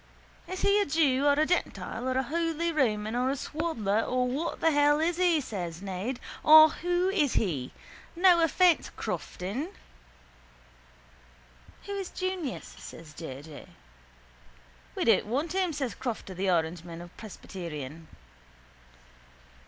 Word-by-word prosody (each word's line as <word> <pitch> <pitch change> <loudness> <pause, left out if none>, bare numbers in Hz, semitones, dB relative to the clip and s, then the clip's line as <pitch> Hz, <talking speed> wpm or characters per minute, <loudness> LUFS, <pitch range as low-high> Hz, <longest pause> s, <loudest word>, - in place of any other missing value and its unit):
—Is 370 0 -5
he 405 +1 +4
a - - +1
jew 285 -2 +2
or 285 - +6
a 300 +2 +2
gentile 240 - -2
or 260 - 0
a 265 - +2
holy 330 +3 -1
Roman 220 -7 0
or 250 +1 +1
a 275 - 0
swaddler 260 -9 -1
or 250 +1 0
what 285 +7 -3
the 325 - +3
hell 290 0 +4
is 330 +2 0
he? 355 -3 +3
says 180 - -5
Ned. 195 +6 -4 0.2
Or 315 0 +9
who 355 +3 0
is 315 -9 +1
he? 145 - -1 0.4
No 350 -1 +5
offence, 340 +2 +3
Crofton. 215 - -4 2.1
—Who 405 - -8
is 390 -2 -4
Junius? 370 -8 -3
says 160 -2 -11
J. 145 -3 -8
J. 155 -2 -11 1.3
—We - - -1
don't - - +4
want 290 +9 -1
him, 375 -2 +1
says 275 -5 -3
Crofter 235 -6 -5
the 190 +1 -1
Orangeman 170 0 -1
or 175 - -11
presbyterian. 165 -7 -8
265 Hz, 135 wpm, -28 LUFS, -, 2.1 s, Or